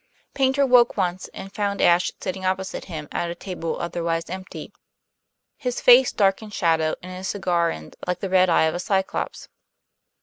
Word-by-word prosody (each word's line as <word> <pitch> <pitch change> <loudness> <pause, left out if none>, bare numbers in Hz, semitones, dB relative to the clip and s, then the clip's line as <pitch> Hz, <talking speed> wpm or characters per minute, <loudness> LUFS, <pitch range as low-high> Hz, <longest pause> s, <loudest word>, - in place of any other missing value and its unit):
Paynter 270 +1 +2
woke 245 -2 +4
once, 180 0 -1
and 195 0 -10
found 200 -2 -2
Ashe 175 +1 +4
sitting 190 0 -5
opposite 190 0 -2
him 155 -5 -7
at 170 - -2
a 170 - -5
table 175 -3 -5
otherwise 170 -1 -2
empty; 185 0 -8 0.8
his 250 -3 -3
face 250 +1 +7
dark 195 -1 +2
in 215 - -9
shadow 165 -5 +1
and 185 0 -8
his 185 +1 -5
cigar 175 -4 0
end 80 0 -8
like 180 0 -1
the 195 - -3
red 185 -1 +4
eye 165 - +4
of 160 0 +1
a 175 - -3
Cyclops. 190 +1 -2
185 Hz, 175 wpm, -23 LUFS, 170-200 Hz, 0.8 s, face